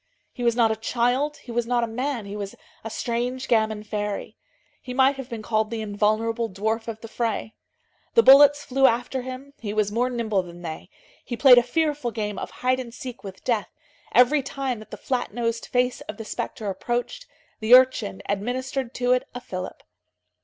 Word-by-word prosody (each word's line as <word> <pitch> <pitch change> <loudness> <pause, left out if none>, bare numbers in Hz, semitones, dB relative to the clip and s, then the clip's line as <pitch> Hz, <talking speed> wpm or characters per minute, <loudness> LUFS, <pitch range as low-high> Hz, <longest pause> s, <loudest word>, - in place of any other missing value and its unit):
He - - -8
was 235 -1 +2
not 230 -2 +4
a - - 0
child, 245 +6 0
he 245 - -11
was 235 0 -1
not 240 -1 +1
a - - 0
man; 250 0 -3
he 200 +1 -7
was 200 -1 -5 0.3
a 225 - -5
strange 245 +3 -2
gamin 220 -2 +1
fairy. 210 -1 -4 0.5
He 250 - -7
might 265 +1 +4
have 270 -1 -7
been 225 -2 -6
called 215 -1 0
the 230 -1 -3
invulnerable 215 +2 0
dwarf 220 +4 -2
of 220 -1 -6
the 230 - -8
fray. 225 -1 -2 0.6
The 460 - +7
bullets 290 +1 +8
flew 270 +1 +4
after 245 +3 0
him, 260 +2 -8
he 210 -2 -4
was 210 -1 +1
more 245 +4 +1
nimble 225 -5 0
than 175 0 -11
they. 160 +2 -6 0.3
He 240 - -5
played 250 -2 +8
a - - +3
fearful 295 0 0
game 210 -3 -3
of - - -5
hide 255 +1 0
and 245 -2 -6
seek 250 0 -8
with 190 -1 -9
death; 230 -4 0 0.4
every 265 +4 +5
time 265 -3 -3
that 215 - -13
the - - -8
flat 245 -5 -2
nosed 230 -1 -2
face 250 0 0
of 210 - -5
the 225 - -7
spectre 215 0 -4
approached, 240 - -3 0.3
the 225 +2 +7
urchin 255 - +3
administered 250 +5 -2
to 245 0 +1
it 250 0 +2
a - - -3
fillip. 185 -6 -7
235 Hz, 195 wpm, -24 LUFS, 215-255 Hz, 0.6 s, bullets